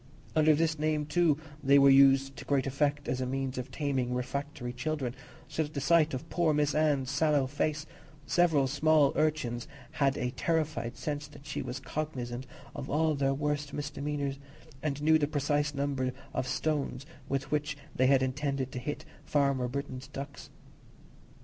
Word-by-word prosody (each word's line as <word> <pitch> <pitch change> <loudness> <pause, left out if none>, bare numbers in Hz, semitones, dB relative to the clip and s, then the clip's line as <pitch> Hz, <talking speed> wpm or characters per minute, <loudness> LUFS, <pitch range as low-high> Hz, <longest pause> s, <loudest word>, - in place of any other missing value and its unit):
Under 155 -1 +5
this 160 0 +1
name 155 -1 +1
too, 160 -1 +3 0.3
they 140 +1 +6
were 140 0 +7
used 135 0 +6
with - - -10
great 140 -2 +2
effect 145 +1 0
as 130 0 -1
a 130 - -1
means 135 0 -2
of 125 - -5
taming 130 -4 -1
refractory 125 0 -4
children, 130 -1 -2 0.3
so - - -2
that 155 - 0
at - - -19
the - - 0
sight 155 +1 +3
of 150 +5 -6
poor 160 -2 +1
Miss 150 -1 +2
Anne's 145 -4 +2
sallow 145 -1 +3
face, 145 +2 -1 0.4
several 160 -6 +3
small 150 +1 +3
urchins 135 -6 0 0.2
had 140 -1 +1
a 125 - -1
terrified 155 -4 -1
sense 145 -1 -3
that 145 -1 -15
she - - -3
was 130 0 -5
cognizant 130 -2 -4 0.3
of 135 - -6
all 155 +1 +2
their 135 -1 +1
worst 145 0 -2
misdemeanours, 145 -1 -3 0.4
and 145 -1 -2
knew 160 +1 +5
the 145 - +1
precise 145 0 0
number 135 -2 -1 0.2
of 130 - -1
stones 145 -2 -1 0.2
with 135 0 -2
which 150 -1 -1 0.2
they 130 - +3
had 135 -1 +4
intended 135 0 -1
to 125 - -4
hit 145 +4 -5 0.2
Farmer 140 -3 +1
Britton's 130 0 -5
ducks. 140 0 -8
140 Hz, 170 wpm, -30 LUFS, 135-150 Hz, 0.4 s, were